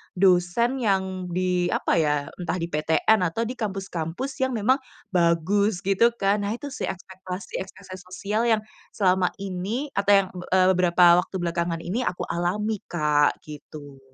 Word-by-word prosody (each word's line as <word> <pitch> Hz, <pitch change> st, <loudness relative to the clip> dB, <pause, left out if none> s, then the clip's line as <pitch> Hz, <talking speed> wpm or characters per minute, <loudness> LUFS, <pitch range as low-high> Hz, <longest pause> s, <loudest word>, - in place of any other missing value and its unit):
dosen 190 Hz, +8 st, +2 dB
yang 190 Hz, -3 st, 0 dB
di 180 Hz, 0 st, 0 dB
apa -, -, 0 dB
ya, 150 Hz, -2 st, +2 dB, 0.2 s
entah 180 Hz, -, -2 dB
di 170 Hz, -, -2 dB
PTN 160 Hz, +8 st, +2 dB
atau 225 Hz, +8 st, -2 dB
di 250 Hz, -, -5 dB
kampus-kampus 195 Hz, -, -4 dB
yang 260 Hz, -1 st, 0 dB
memang 250 Hz, +6 st, +2 dB, 0.3 s
bagus 180 Hz, +3 st, +2 dB
gitu 195 Hz, +4 st, +4 dB
kan. 200 Hz, 0 st, +1 dB
Nah 210 Hz, -, -1 dB
itu 285 Hz, +4 st, -7 dB
sih -, -, -4 dB
ekspektasi-ekspektasi 185 Hz, 0 st, -7 dB
sosial 200 Hz, +5 st, -2 dB
yang 220 Hz, -1 st, +3 dB, 0.3 s
selama 185 Hz, -2 st, +3 dB
ini 200 Hz, +9 st, -3 dB
atau 200 Hz, +1 st, +2 dB
yang, -, -, -11 dB
be 180 Hz, -, -7 dB
eee, 185 Hz, 0 st, +5 dB
beberapa 175 Hz, -1 st, +5 dB
waktu -, -, -12 dB
belakangan 170 Hz, -1 st, -2 dB
ini 190 Hz, +8 st, -2 dB
aku 180 Hz, -, -3 dB
alami 205 Hz, +5 st, -1 dB
Kak, 150 Hz, -3 st, +1 dB
gitu. 145 Hz, -2 st, -11 dB
185 Hz, 155 wpm, -24 LUFS, 175-205 Hz, 0.3 s, eee